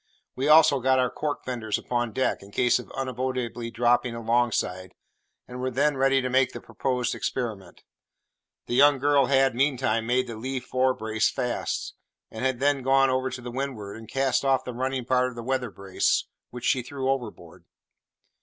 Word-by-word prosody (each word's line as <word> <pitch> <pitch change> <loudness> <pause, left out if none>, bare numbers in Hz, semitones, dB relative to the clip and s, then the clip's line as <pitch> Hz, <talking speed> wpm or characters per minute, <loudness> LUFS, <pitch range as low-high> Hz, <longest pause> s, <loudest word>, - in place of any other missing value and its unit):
We 135 +2 -1
also 150 -2 +6
got 130 +1 +3
our 125 -1 +1
cork 150 -1 -4
fenders 115 -4 -2
upon 120 -2 -2
deck, 130 +5 -1
in 100 - -13
case 125 +4 +2
of - - -10
unavoidably 125 -2 -3
dropping 120 +1 +1
alongside, 115 -6 -1 0.5
and 125 0 -7
were 130 - -1
then 140 +3 +1
ready 135 0 +2
to - - 0
make 130 0 +2
the - - -6
proposed 125 -2 -2
experiment. 105 -8 -4 0.8
The - - -5
young 140 +2 +6
girl 140 -1 +3
had, 135 -1 +3
meantime, 125 -4 0
made 125 +1 +2
the 115 -3 -7
lee 130 +3 -3
fore 130 +1 0
brace 110 0 0
fast, 125 -2 -3 0.4
and 110 - -6
had 130 -2 0
then 140 0 +2
gone 135 +1 +3
over 130 0 0
to 125 -1 -7
windward 125 -6 -4
and 110 -1 -11
cast 135 -1 +1
off 135 -1 +2
the 125 - -6
running 130 +1 -2
part 125 0 +2
of 125 - -12
the 120 - -6
weather 130 -1 -1
brace, 100 -2 0 0.2
which 125 0 -8
she 130 - +2
threw 130 +2 -5
overboard. 105 -10 -4
125 Hz, 180 wpm, -26 LUFS, 120-135 Hz, 0.8 s, also